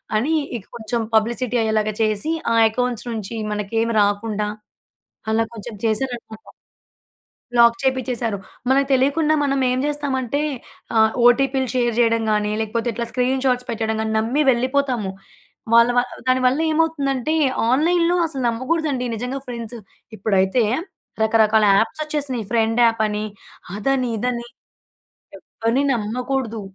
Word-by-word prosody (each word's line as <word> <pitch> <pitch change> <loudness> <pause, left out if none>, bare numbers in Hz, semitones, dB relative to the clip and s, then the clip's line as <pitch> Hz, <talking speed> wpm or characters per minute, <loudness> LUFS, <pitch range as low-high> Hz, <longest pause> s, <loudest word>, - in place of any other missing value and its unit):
అని 255 +9 +1 0.2
ఇక 195 - -12
కొంచెం 235 0 -3
పబ్లిసిటీ 235 +3 +1
అయ్యేలాగా 215 -1 0
చేసి 215 +7 0 0.2
ఆ - - +3 0.2
అకౌంట్స్ 245 +1 -2
నుంచి 220 0 -5 0.2
మనకేమి 225 +3 -1
రాకుండా 205 +1 0 0.8
అలా 225 +1 +2
కొంచెం 230 +1 -8
చేసారన్నమాట. 225 -1 -3 1.1
లాక్ 235 0 +7
చేపిచ్చేసారు. 250 -5 -1 0.3
మనకు 270 +1 +3
తెలియకుండా 285 +4 +3
మనం 275 -1 0
ఏం 250 - 0
చేస్తామంటే 285 -2 -2 0.6
ఆహ్, 220 0 +5 0.2
ఓటీపీలు 265 +1 +3
షేర్ 240 -1 +1
చేయడం 230 -1 +3
కాని 210 0 0
లేకపోతే, 225 +2 -2
ఇట్లా 235 +2 -3
స్క్రీన్ 255 +1 0
షాట్స్ 250 -1 +1
పెట్టడం 220 -1 -2
గాని 220 0 -2
నమ్మి 235 +7 +1
వెళ్ళిపోతాము. 255 -4 0 0.6
వాళ్ళ 235 0 +7
వా - - +5 0.3
దానివల్ల 255 +2 +3
ఏమవుతుందంటే, 310 -3 0 0.4
ఆన్‍లైన్‍లో 335 +6 +3
అసలు 275 -5 -5
నమ్మకూడదండి 260 +2 -1
నిజంగా 250 +4 -4
ఫ్రెండ్స్ 235 -1 -6 0.4
ఇప్పుడైతే 195 +3 +2 0.6
రకరకాల 220 -1 +4
యాప్స్ 225 +8 -1
వచ్చేసినాయి, 285 -6 -3
ఫ్రెండ్ 225 0 +2
యాప్ 225 -1 +1
అని 210 0 -3 0.5
అదని, 255 +3 0
ఇదని 240 +1 -2 0.9
ఎవ్వరిని 230 +5 -1
నమ్మకూడదు. 235 +1 -3
240 Hz, 120 wpm, -21 LUFS, 220-265 Hz, 1.1 s, లాక్